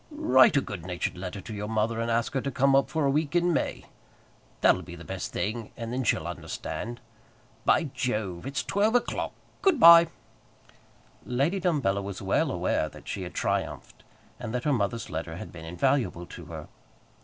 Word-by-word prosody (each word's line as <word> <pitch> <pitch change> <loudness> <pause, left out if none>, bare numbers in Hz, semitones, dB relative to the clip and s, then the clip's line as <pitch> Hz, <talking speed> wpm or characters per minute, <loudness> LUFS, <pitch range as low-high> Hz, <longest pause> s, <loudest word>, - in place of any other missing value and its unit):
"Write 140 - +5
a - - +4
good 95 -9 -7
natured 90 -1 -3
letter 90 +2 -6
to 110 - -8
your 105 0 -4
mother, 110 +1 0
and 115 0 -1
ask 115 0 0
her 135 - 0
to 140 - -2
come 135 +1 +3
up 135 0 +3
for 155 0 0
a - - +3
week 150 +2 0
in 175 0 +3
May. - - -2 0.8
That'll 90 - +5
be 85 -1 -9
the 85 - -10
best 95 -1 -5
thing; 110 +1 -3
and 115 0 -5
then 130 +1 -1
she'll 115 - +1
understand. 120 +2 -5 0.7
By - - +4
Jove, 105 -5 -2
it's 135 -4 -2
twelve 200 - +1
o'clock. 245 - 0 0.3
Good 380 -8 +3
by." 170 -2 +10 1.2
Lady 140 +10 0
Dumbello 140 - +1
was 100 -1 -6
well - - +1
aware - - 0
that - - -14
she - - -4
had - - -7
triumphed, - - -3 0.4
and 110 - -4
that 125 - -2
her 150 - +2
mother's 115 0 -1
letter 80 +1 -4
had - - -8
been 80 -2 -10
invaluable 110 0 0
to - - -10
her. - - -8
120 Hz, 190 wpm, -27 LUFS, 100-140 Hz, 1.2 s, by